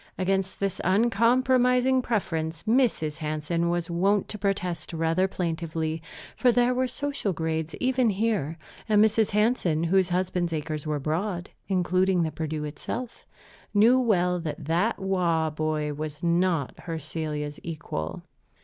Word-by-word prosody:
Against 190 0 -1
this 195 -2 -2
uncompromising 250 +5 +3
preference 165 -9 -2
Mrs. 220 - +1
Hansen 155 +2 -1
was 175 -1 -1
wont 195 +4 +2
to 210 - -6
protest 180 -5 -2
rather 165 +3 +1
plaintively; 165 -3 -3 0.3
for 250 - +4
there 245 +1 +3
were 255 +1 +1
social 280 -6 -2
grades 160 -1 -2
even 255 -2 +2
here, 200 -7 0 0.3
and 210 0 +6
Mrs. 220 0 +2
Hansen, 210 -7 +1
whose 185 +2 +3
husband's 180 -1 0
acres 155 -1 -3
were 150 -1 -1
broad 175 +5 -2 0.2
(including 185 -1 +2
the 160 - -1
Perdu 155 0 -3
itself), 190 - -6 0.5
knew 230 +5 +6
well 180 -7 +2
that 155 -2 -5
"that 175 +9 +1
Waugh 170 -5 +1
boy" 155 -1 -1
was 150 +1 -6
not 170 -4 +1
her 165 -2 -3
Celia's 150 -1 -4
equal. 155 - -5
175 Hz, 135 wpm, -26 LUFS, 160-210 Hz, 0.5 s, and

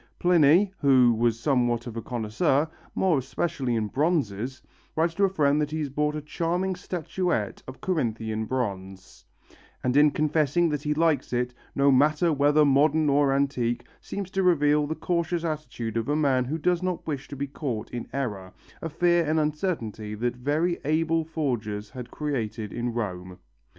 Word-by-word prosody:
Pliny, 175 +3 +4
who 130 -4 +5
was 115 0 +1
somewhat 120 -3 +1
of 120 -2 -7
a 115 - -3
connoisseur, 125 +7 0 0.3
more 180 -7 +2
especially 130 -1 -2
in 110 -2 0
bronzes, 130 - -1 0.4
writes 165 +1 +1
to 200 +3 +3
a - - +1
friend 150 -5 +2
that 150 - -1
he 155 - -3
has 150 -3 -3
bought 150 +2 0
a 150 - -5
charming 175 +5 -1
statuette 175 - -2
of 130 - -10
Corinthian 110 -10 -1
bronze, 95 -6 -5 0.6
and 125 0 0
in 150 +1 +6
confessing 155 +2 +1
that 150 -2 -2
he 150 0 -1
likes 155 -4 +1
it, 125 0 0 0.2
"no 140 0 +4
matter 150 +5 +3
whether 145 +1 +4
modern 145 +2 +3
or 140 0 +3
antique," 125 -4 0
seems 195 -2 -6
to 195 -2 0
reveal 150 -4 +3
the 160 - -3
cautious 170 0 -1
attitude 130 -8 -4
of 115 +3 -1
a 145 - +2
man 135 -4 +2
who 150 +6 -2
does 175 +2 +1
not 185 -2 -2
wish 145 -3 -4
to - - -8
be 140 +1 -2
caught 135 -6 -5
in 120 - -5
error, 105 -9 -4 0.3
a 165 - -3
fear 175 +2 +2
and 155 +1 +1
uncertainty 150 - -2
that 120 +3 -2
very 150 +7 0
able 160 +2 +1
forgers 115 -10 -3
had 125 -3 -8
created 115 -8 -3
in 120 0 -2
Rome. 90 -6 -4
145 Hz, 170 wpm, -26 LUFS, 120-160 Hz, 0.6 s, in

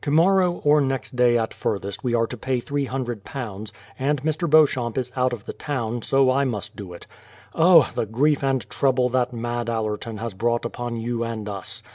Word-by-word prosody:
Tomorrow 175 +4 +3
or 150 0 +5
next 135 -1 -2
day 120 -1 +4
at 115 -1 -2
furthest 100 -1 -3
we 120 -2 +1
are 115 0 +2
to 125 - -7
pay 130 +2 -1
£300, 120 -6 -4 0.3
and 140 0 0
Mr. 155 +2 -1
Beauchamp 140 -7 +3
is 125 -1 -2
out 130 0 +1
of 115 -5 -6
the - - -6
town, 120 -5 -3
so 135 +2 +3
I 135 +2 +2
must 110 -4 -3
do 100 -4 -8
it. 85 - -10 0.5
O! 165 -3 +6
the 110 - -2
grief 140 +7 +1
and 130 -6 0
trouble 130 +1 +1
that 125 0 0
mad 120 0 -3
Mr. 115 - -1
Allerton 110 0 -3
has 115 0 -5
brought 120 +4 0
upon 120 0 -4
you 115 +1 -2
and 115 -2 -4
us 100 -2 -4
120 Hz, 195 wpm, -23 LUFS, 115-135 Hz, 0.5 s, O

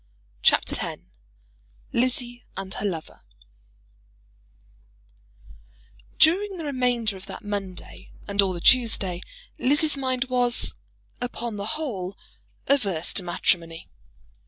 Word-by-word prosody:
CHAPTER - - +4
X - - -4 0.9
Lizzie 245 0 +1
and 195 0 -5
Her 205 - -1
Lover 165 -5 -5 3.0
During 385 +4 +4
the 330 - -5
remainder 245 -6 0
of 190 - -12
that - - -8
Monday 200 -3 -6 0.2
and 200 0 +3
all 195 -1 +1
the 175 - -6
Tuesday, 210 -8 +4 0.4
Lizzie's 295 +3 +4
mind 260 -2 0
was, 245 -1 +1 0.5
upon 240 -3 -3
the 200 +1 -4
whole, 200 - -4 0.5
averse 200 - +1
to - - +2
matrimony. 170 -1 -1
230 Hz, 105 wpm, -25 LUFS, 190-255 Hz, 3.0 s, CHAPTER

